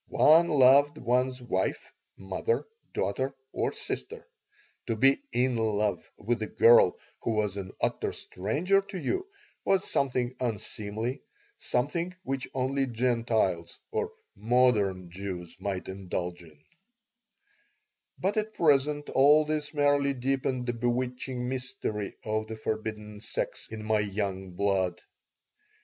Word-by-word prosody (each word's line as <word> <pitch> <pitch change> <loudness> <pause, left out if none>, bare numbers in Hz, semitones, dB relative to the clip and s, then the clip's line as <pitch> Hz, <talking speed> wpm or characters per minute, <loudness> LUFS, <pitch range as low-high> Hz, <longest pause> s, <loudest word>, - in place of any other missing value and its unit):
One 165 +3 +6
loved 145 +1 +5
one's 125 0 +1
wife, 115 -7 -2 0.3
mother, 440 - -1 0.3
daughter, 135 +1 -1 0.2
or - - 0
sister. 65 - -5 0.6
To 115 - 0
be 135 - +4
"in 125 0 +1
love" 105 -2 0
with 115 +2 -1
a 110 - -1
girl 115 -6 +6 0.2
who 115 - -1
was 105 -3 0
an 95 -2 -5
utter - - 0
stranger 155 - 0
to 195 0 -8
you 375 - -2 0.4
was 195 0 +2
something 125 -2 0
unseemly, 110 +1 -3 0.4
something 170 +8 -1
which 135 -1 -3
only 135 +1 0
Gentiles 115 -7 0
or 445 0 -1 0.2
"modern" 105 -7 +2
Jews 90 -2 -6
might 95 -2 -3
indulge 90 -2 -4
in 80 -3 -16 1.6
But 200 +3 0
at 215 0 -1
present 145 -1 +3
all 150 +3 +6
this 150 -1 -2
merely 145 -2 +2
deepened 130 0 -1
the 120 - -1
bewitching 125 +1 -2
mystery 125 -5 -4
of 110 0 -1
the 110 0 -6
forbidden 110 -1 -4
sex - - -4
in 110 -1 -7
my 110 0 +2
young 100 -2 -2
blood. 95 -2 0
120 Hz, 125 wpm, -29 LUFS, 105-140 Hz, 1.6 s, One